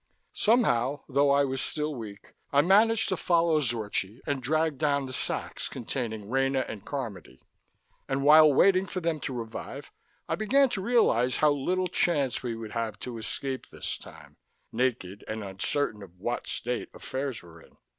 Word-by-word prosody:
Somehow, 145 - +2
though 140 +1 +3
I 140 0 +4
was 135 0 -2
still 150 0 -2
weak, 105 -6 -9 0.2
I 140 - +5
managed 210 +6 +4
to 185 - +1
follow 170 -2 +3
Zorchi 110 -3 -2
and 140 -2 -1
drag 155 +2 0
down 140 -2 +1
the 130 - -7
sacks - - -3
containing 110 -4 -4
Rena 135 +2 +1
and 105 -3 -7
Carmody. 115 - -6 0.7
And 135 0 0
while 155 +1 +8
waiting 190 +6 +4
for 185 - -3
them 165 -3 -1
to 135 - -4
revive, 115 -1 -7 0.4
I - - -1
began 265 +6 +3
to 195 - -3
realize 155 - +3
how 150 -1 +4
little 180 +6 0
chance 150 -7 +1
we 120 -2 -3
would 110 -2 -7
have 115 -2 -3
to 120 -2 -5
escape 130 +4 -4
this - - -4
time, - - -14 0.3
naked 110 -6 -1
and 110 0 -4
uncertain 105 +4 -2
of 90 -2 -13
what 120 +5 -3
state 125 +1 -3
affairs 130 -6 -4
were 85 -1 -14
in. - - -21
135 Hz, 165 wpm, -28 LUFS, 115-155 Hz, 0.7 s, while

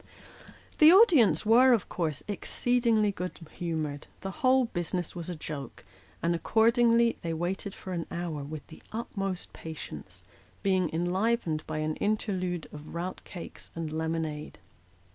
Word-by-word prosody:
The 310 +1 +9
audience 350 - +6
were, 245 +4 +7
of 220 -6 +1
course, 155 -5 -2
exceedingly 225 0 +1
good 180 -2 -5
humoured; 155 -4 -3
the 195 - -4
whole 260 -1 +5
business 175 -4 -3
was 170 0 -5
a 175 - -3
joke; 150 -4 -7 0.4
and 170 +1 +2
accordingly 230 +5 +4
they 165 -2 -2
waited 185 +4 -3
for 185 - -7
an 170 -2 -3
hour 170 -4 -3
with 150 +1 -7
the 160 - -14
utmost 195 -5 -4
patience, 95 - -8 0.4
being 185 -3 +2
enlivened 175 -1 0
by 155 - -3
an 155 0 -1
interlude 185 -5 -1
of 150 +2 -9
rout 180 +2 -4
cakes 175 - -9
and 165 -2 -4
lemonade. 160 -1 -3
180 Hz, 140 wpm, -29 LUFS, 160-220 Hz, 0.4 s, The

